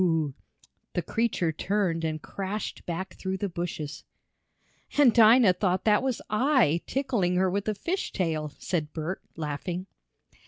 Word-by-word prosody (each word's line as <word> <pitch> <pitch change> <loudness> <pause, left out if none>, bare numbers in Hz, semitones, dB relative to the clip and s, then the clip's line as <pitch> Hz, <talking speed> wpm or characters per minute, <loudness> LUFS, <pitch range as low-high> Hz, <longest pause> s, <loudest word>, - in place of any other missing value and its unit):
the 175 - -1
creature 220 -7 0
turned 175 0 0
and 155 -1 -2
crashed 200 +2 -4
back 185 +2 -4
through 190 0 -3
the 200 - -1
bushes. 170 -4 -5 0.9
"And 275 -6 +6
Dinah 225 -3 +7
thought 185 0 0
that 210 -1 +4
was 260 -3 -2
I, 215 - +3
tickling 240 -10 0
her 185 0 +2
with 200 +2 -2
a 215 - 0
fish 360 - -2
tail," 160 -5 -1
said 155 -4 -2
Bert, 165 +4 -3 0.2
laughing. 165 +4 -3
185 Hz, 140 wpm, -27 LUFS, 165-215 Hz, 0.9 s, Dinah